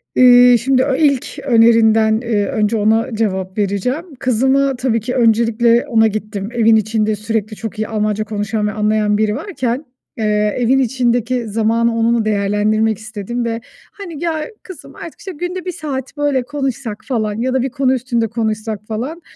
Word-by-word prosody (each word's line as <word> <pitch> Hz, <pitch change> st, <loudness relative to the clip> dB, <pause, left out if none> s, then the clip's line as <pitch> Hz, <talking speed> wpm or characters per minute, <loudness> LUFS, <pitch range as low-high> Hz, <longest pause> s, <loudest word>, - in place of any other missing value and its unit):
İii, 245 Hz, -1 st, +7 dB
şimdi 260 Hz, +1 st, +2 dB
o 275 Hz, -, 0 dB
ilk 280 Hz, -3 st, 0 dB
önerinden, 225 Hz, -2 st, +4 dB
eee, 220 Hz, -4 st, 0 dB
önce 215 Hz, +1 st, 0 dB
ona 220 Hz, +3 st, +1 dB
cevap 190 Hz, -3 st, -2 dB
vereceğim. 210 Hz, -, -1 dB
Kızıma 265 Hz, +3 st, +2 dB
tabii 245 Hz, -2 st, 0 dB
ki 245 Hz, +4 st, -4 dB
öncelikle 235 Hz, 0 st, +3 dB
ona 225 Hz, -2 st, +3 dB
gittim 210 Hz, -1 st, -4 dB
evin 225 Hz, -1 st, +4 dB
içinde 215 Hz, 0 st, +1 dB
sürekli 215 Hz, 0 st, -3 dB
çok 225 Hz, 0 st, -7 dB
iyi 215 Hz, -, -1 dB
Almanca 215 Hz, -1 st, -1 dB
konuşan 210 Hz, 0 st, -2 dB
ve -, -, -1 dB
anlayan 210 Hz, -1 st, +1 dB
biri 215 Hz, 0 st, +1 dB
varken, 270 Hz, -, -3 dB, 0.3 s
eee, 210 Hz, -1 st, 0 dB
evin 250 Hz, +2 st, +2 dB
içindeki 245 Hz, -1 st, 0 dB
zamanı 230 Hz, +2 st, +1 dB
onunla 230 Hz, 0 st, +1 dB
değerlendirmek 210 Hz, +1 st, +1 dB
istedim 220 Hz, +2 st, -5 dB
ve 230 Hz, 0 st, -3 dB, 0.3 s
hani 345 Hz, -6 st, -8 dB
"Ya, 320 Hz, -2 st, -1 dB, 0.2 s
kızım 370 Hz, -6 st, -12 dB
artık 335 Hz, -, -10 dB
işte 380 Hz, -, -7 dB
günde 355 Hz, +3 st, -5 dB
1 365 Hz, -, -2 dB
saat 290 Hz, -5 st, -6 dB
böyle 285 Hz, -3 st, 0 dB
konuşsak." 270 Hz, -5 st, -4 dB
falan 215 Hz, -5 st, -1 dB
"Ya 255 Hz, +1 st, -1 dB
da 260 Hz, -, +1 dB
1 265 Hz, -, -1 dB
konu 265 Hz, 0 st, +1 dB
üstünde 240 Hz, -2 st, -1 dB
konuşsak." 220 Hz, -1 st, -3 dB
falan 255 Hz, +10 st, -4 dB
230 Hz, 165 wpm, -17 LUFS, 215-260 Hz, 0.3 s, İii